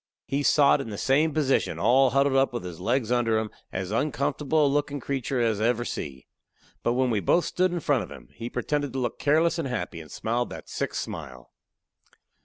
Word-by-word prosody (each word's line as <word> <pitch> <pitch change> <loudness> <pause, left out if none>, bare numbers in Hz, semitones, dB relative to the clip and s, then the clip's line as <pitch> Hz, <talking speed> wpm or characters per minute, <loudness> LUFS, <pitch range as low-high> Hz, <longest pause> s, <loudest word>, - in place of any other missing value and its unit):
He 140 +1 -1
sot 145 0 +4
in 115 - -6
the 105 - -5
same 150 +7 +2
position, 140 - +1
all 125 +8 +4
huddled 140 +1 +2
up, 135 -1 +3
with 120 - -4
his 90 -2 -7
leg 120 +4 0
under 120 -2 +2
him, 110 -1 -2 0.2
as 95 0 -4
uncomfortable 145 +4 +1
a - - +4
lookin' 145 0 0
creeter 135 0 -2
as 110 -3 +1
I 110 - +3
ever 120 0 0
see. 65 - -6 0.6
But 120 - +1
when 130 0 +1
we 110 - +1
both 170 - +2
stood 185 0 +1
in 175 -1 -2
front 140 -6 +2
of 90 - -10
him, 70 - -12
he 120 0 -6
pretended 145 +2 -2
to 135 - -2
look 120 -2 -3
careless 160 +3 +2
and 155 - -1
happy, 120 -9 -4
and 80 - -13
smiled 120 +8 -2
that - - -9
sick - - -3
smile. 65 -1 -6
130 Hz, 210 wpm, -26 LUFS, 110-145 Hz, 0.6 s, sot